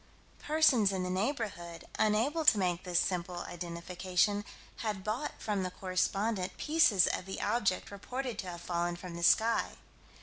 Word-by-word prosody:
Persons 290 -10 +4
in 190 -1 -2
the 180 - -2
neighborhood, 185 - -3
unable 230 +10 +2
to 225 - +7
make 180 -3 0
this 180 -1 +2
simple 180 -1 -2
identification, 180 +4 -1 0.3
had 210 -4 -3
bought 220 +8 -2
from 205 -3 -1
the 185 - -2
correspondent 190 +2 -1
pieces 300 - +4
of 185 - -2
the 190 - -5
object 205 -6 0
reported 250 +5 -5
to 190 - -4
have 175 -1 -7
fallen 175 0 -1
from 175 0 -8
the 170 - -6
sky. 225 +6 +3
190 Hz, 155 wpm, -32 LUFS, 180-220 Hz, 0.3 s, to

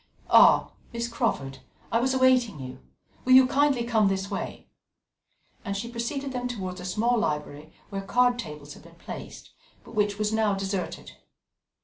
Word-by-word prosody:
"Ah! - - +6 0.2
Miss 235 0 -3
Crawford! 135 - -2 0.3
I 230 - +3
was 260 +2 +1
awaiting 255 - +3
you. 130 0 -8 0.4
Will 255 - +4
you 260 0 +9
kindly 275 -1 +2
come 225 -3 +2
this 195 +1 -2
way?" 195 - -5 1.0
And 200 0 -3
she 235 +4 -5
preceded 270 +4 -3
them 250 -1 -3
towards 185 -6 -5
a - - -8
small 225 +6 +1
library, 150 -3 -3 0.2
where 195 -1 -3
card 245 +5 +2
tables 150 -7 -7
had - - -14
been 170 +2 -17
placed, - - -9 0.3
but - - -14
which 205 -2 0
was 210 0 -1
now 215 -2 +2
deserted. 195 -1 -4
215 Hz, 160 wpm, -26 LUFS, 185-245 Hz, 1.0 s, you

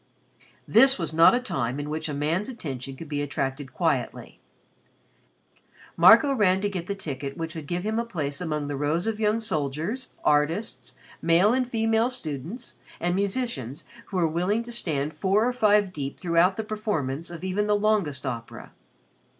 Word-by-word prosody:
This 265 +4 +6
was 165 -4 -4
not 165 +8 +7
a - - +2
time 135 - -2
in 145 - -4
which 155 +1 -3
a - - -3
man's 160 - -1
attention 135 - -6
could 160 +4 -9
be 145 -1 -2
attracted 135 -1 -3
quietly. - - -2 1.6
Marco 225 +10 +7
ran 190 -6 +3
to 205 0 -1
get 180 -3 -4
the 200 - -2
ticket 140 -7 -5
which 165 -1 -4
would 160 -3 -7
give 175 +2 -2
him 220 +2 -1
a - - 0
place 150 -10 -3
among 150 -4 -2
the 145 - -3
rows 150 +5 0
of 220 -1 -2
young 215 +1 +2
soldiers, 165 - -2
artists, 155 +8 0 0.3
male 175 +6 +4
and 255 -1 0
female 225 0 +2
students, 175 - -6 0.2
and 175 +1 0
musicians 195 - -2 0.2
who 195 - -4
were 170 -2 +3
willing 180 +8 0
to 240 - -9
stand 155 -10 -2
four 195 +8 +2
or 250 - 0
five 210 -5 +3
deep 140 -3 -5
throughout 175 +2 +2
the 220 - -2
performance 170 -9 -3
of 170 0 -9
even 195 +3 -1
the 210 - +3
longest 205 -10 0
opera. 115 -2 -6
175 Hz, 175 wpm, -26 LUFS, 145-215 Hz, 1.6 s, not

